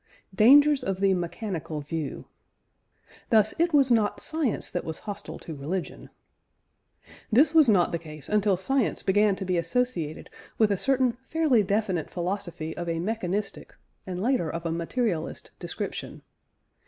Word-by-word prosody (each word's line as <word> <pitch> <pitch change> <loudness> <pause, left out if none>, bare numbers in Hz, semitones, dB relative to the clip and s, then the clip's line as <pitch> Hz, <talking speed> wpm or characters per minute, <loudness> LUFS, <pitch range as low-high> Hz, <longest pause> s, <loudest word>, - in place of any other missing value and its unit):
DANGERS 285 +7 +6
OF 190 -1 -2
THE 195 -1 +3
"MECHANICAL 175 -3 -4
VIEW." 150 0 -5 1.0
Thus 215 -1 +4
it 340 +1 +3
was 275 -4 +4
not 220 -3 +2
science 310 -8 -1
that 175 - -2
was 160 -1 -5
hostile 205 -1 -6
to 165 - -8
religion. 160 +6 -5 1.2
This 285 +7 +5
was 310 -6 +6
not 185 -5 +4
the 170 - -2
case 155 -3 -10
until 210 -2 +2
science 250 +5 0
began 205 +1 +3
to 190 - -5
be 180 -1 0
associated 170 -4 -2 0.3
with 215 -2 +3
a - - +3
certain 260 +2 +2 0.2
fairly 310 -8 +3
definite 200 -4 -1
philosophy 175 -3 -4
of 175 -1 -4
a 165 - -1
mechanistic, 200 0 -3 0.3
and 180 -1 -4
later 230 -6 +1
of 165 +2 -5
a 165 - -1
materialist, 170 +1 -2
description. - - -5
195 Hz, 145 wpm, -26 LUFS, 170-235 Hz, 1.2 s, DANGERS